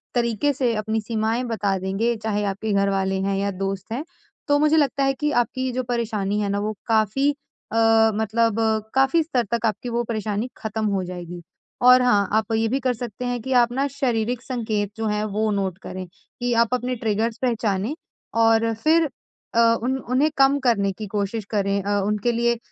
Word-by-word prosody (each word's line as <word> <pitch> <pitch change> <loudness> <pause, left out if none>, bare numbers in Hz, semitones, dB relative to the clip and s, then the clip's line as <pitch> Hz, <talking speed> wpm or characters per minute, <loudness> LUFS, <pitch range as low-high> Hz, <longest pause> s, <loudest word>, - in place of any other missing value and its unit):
तरीके 235 +3 +1
से 245 -3 0
अपनी 220 +1 -1
सीमाएँ 225 +2 -1
बता 205 -4 -1
देंगे, 195 +6 0
चाहे 215 -1 -2
आपके 200 +2 -2
घर 200 0 +2
वाले 195 -1 0
हैं 195 0 0
या 200 +1 0
दोस्त 195 +1 -4
हैं, 260 +6 -3 0.4
तो 290 -1 +4
मुझे 305 +1 +4
लगता 280 -2 +2
है 270 0 +2
कि 295 +2 -1
आपकी 245 +1 0
ये 260 - -1
जो 255 - -1
परेशानी 220 -4 -1
है 205 - -1
ना, 200 - 0
वो 215 +1 -2
काफ़ी 225 +5 +2 0.4
अ, 225 0 +4
मतलब 220 +1 +1 0.4
काफ़ी 270 +5 +4
स्तर 255 -6 0
तक 235 -1 0
आपकी 220 +3 -3
वो 235 0 0
परेशानी 220 +1 -2
खत्म 220 0 -3
हो 195 -2 0
जाएगी। 175 -1 -7 0.4
और 250 +1 +7
हाँ, 205 -6 +3
आप 220 +1 +1
ये 225 0 +2
भी 260 +5 0
कर 255 -1 0
सकते 240 0 -6
हैं 245 0 -1
कि 265 +3 -2
आप 235 - +1
ना 275 +2 0
शारीरिक 245 -3 -1
संकेत 220 -5 -2
जो 225 0 -1
हैं, 210 0 0
वो 215 +1 -1
नोट 195 -3 -1
करें 185 0 -6
कि 240 +6 -5
आप 235 +1 +2
अपने 250 +1 -1
ट्रिगर्स 220 0 -1
पहचाने 225 -1 0 0.5
और 225 0 +3
फिर 320 0 +4 0.5
अ, - - +4 0.2
उन 260 +2 0
उन्हें 280 +5 +3
कम 270 +1 +5
करने 225 -7 +2
की 215 - -5
कोशिश 205 +1 -2
करें। 200 -1 +1
अ, 205 0 0
उनके 210 +3 0
लिए 235 0 +1
225 Hz, 195 wpm, -23 LUFS, 205-245 Hz, 0.5 s, और